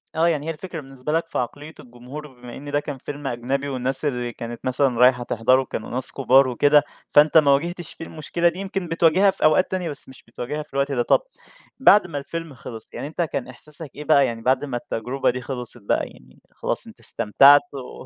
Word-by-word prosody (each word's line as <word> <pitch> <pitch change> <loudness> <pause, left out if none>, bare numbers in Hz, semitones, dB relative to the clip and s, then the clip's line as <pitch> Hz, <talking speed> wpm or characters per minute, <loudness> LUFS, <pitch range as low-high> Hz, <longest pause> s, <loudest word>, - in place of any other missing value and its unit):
آه، 165 +1 +3
يعني 155 -2 0
هي - - 0
الفكرة 165 +1 -7
بالنسبة 135 +1 -7
لك 165 +1 0
في - - -5
عقلية 145 +6 -4
الجمهور 125 +5 -10
بما 125 -3 -12
إن 145 +1 -8
ده 145 - +2
كان 145 -2 -6
فيلم 145 +2 -7
أجنبي 135 +3 -2
والناس 130 +2 -1
اللي 125 -4 -2
كانت 120 0 -8
مثلًا 130 -1 +2
رايحة 125 -1 +5
تحضره 130 +3 +2
كانوا 115 - -6
ناس 130 +2 0
كُبار 135 0 +4
وكده، 145 +4 +4 0.3
فأنت 150 +2 +5
ما 145 -3 +6
واجهتش 170 +4 -1
فيه 165 - -9
المشكلة 170 +2 0
دي، 175 - -9
يمكن 195 -2 -4
بتواجهها 170 +4 +4
في - - -7
أوقات 155 +4 +4
تانية 185 -3 -2
بس 145 -3 -6
مش 130 - -15
بتواجهها 135 +6 -5
في 150 - -21
الوقت 140 +1 0
ده. 125 -3 +1
طَب - - +3 0.6
بعد 210 -7 +6
ما 145 -4 -5
الفيلم 165 +2 -6
خلص 115 -2 -10
يعني - - -5
أنت 160 +3 -4
كان 150 -6 -2
إحساسك 150 +4 -9
إيه 150 - -7
بقى 145 -2 +4
يعني 115 -2 -4
بعد 130 +4 +1
ما 130 -4 -3
التجربة 125 +3 -2
دي 125 +1 -2
خلصِت 120 -2 -7
بقى، 100 - 0
يعني 65 0 -18
خلاص - - -3
أنت - - -14
استمتعت 140 +6 +5
و 130 -1 -9
140 Hz, 215 wpm, -23 LUFS, 125-155 Hz, 0.6 s, ما